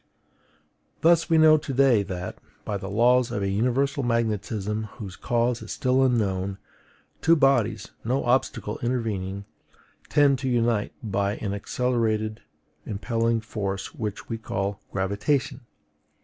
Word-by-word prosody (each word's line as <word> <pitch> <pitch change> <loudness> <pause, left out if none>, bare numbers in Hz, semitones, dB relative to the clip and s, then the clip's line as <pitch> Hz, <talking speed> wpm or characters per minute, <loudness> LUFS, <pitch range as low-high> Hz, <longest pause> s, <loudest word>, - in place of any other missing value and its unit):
Thus, 165 +1 +4
we 165 - +4
know 155 0 +7
to 145 -2 -5
day 130 -5 +5
that, 90 -2 -5 0.3
by 105 - -2
the 95 0 -6
laws 120 +4 +3
of 105 -4 -2
a - - 0
universal 125 +7 +1
magnetism 110 -3 -1
whose 95 -4 -8
cause 120 +3 0
is - - -8
still 130 0 +2
unknown, 100 -6 0 0.6
two 165 - +5
bodies 120 -8 +2
(no 130 +4 0
obstacle 120 -4 0
intervening) 100 -5 -2 0.6
tend 140 -3 +4
to 130 0 -2
unite 115 -3 +1
by 100 -1 0
an 100 -2 -3
accelerated 110 0 -1 0.4
impelling 115 +2 -1
force 100 -3 -4
which 105 -3 -5
we 115 -1 -4
call 100 -2 -3
GRAVITATION. 105 +7 -1
115 Hz, 130 wpm, -25 LUFS, 100-125 Hz, 0.6 s, know